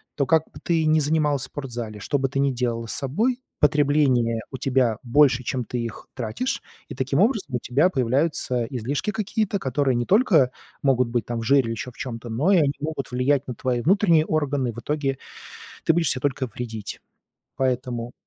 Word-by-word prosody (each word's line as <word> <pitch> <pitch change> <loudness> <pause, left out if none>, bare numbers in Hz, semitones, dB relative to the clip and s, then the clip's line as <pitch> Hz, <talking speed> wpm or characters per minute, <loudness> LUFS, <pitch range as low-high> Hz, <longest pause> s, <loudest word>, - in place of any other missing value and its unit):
то 140 - +1
как 160 +3 +3
бы - - -12
ты 165 -2 +1
ни 155 0 +4
занималась 150 -2 +1
в - - -3
спортзале, 120 -7 -6
что 145 +7 -1
бы 135 0 0
ты 135 - -2
ни 140 0 +2
делала 120 -2 -2
с - - -3
собой, 220 - 0 0.2
потребление 145 -6 +3
у 130 - -5
тебя 125 -4 +1
больше, 130 0 +4
чем 125 0 -2
ты 125 - -4
их 115 -2 -6
тратишь. 135 - -3 0.3
И - - -8
таким 135 +2 0
образом 210 - +1
у - - 0
тебя 140 +10 +2
появляются 130 -2 +1
излишки 135 - -2
какие-то, 210 -1 -1
которые 135 -2 0
не 120 0 0
только 185 - +4 0.3
могут 125 -3 +2
быть, 120 -2 -1
там, 120 -1 -3
в 115 - -4
жире 135 +4 +5
или 115 - -3
ещё 115 +3 -5
в - - -24
чём-то, 120 -2 -6
но 135 - +1
и - - +6
они 145 -4 +3
могут 150 -3 -4
влиять 135 +2 +1
на 125 - -5
твои 125 -2 -1
внутренние 170 - +4
органы. 145 -5 0
В 115 - -8
итоге 140 0 -2 0.7
ты - - +4
будешь 165 -3 +2
себе 130 - 0
только 135 -2 -1
вредить. 110 -2 -6 0.6
Поэтому 125 -2 -2
135 Hz, 195 wpm, -24 LUFS, 120-150 Hz, 0.7 s, и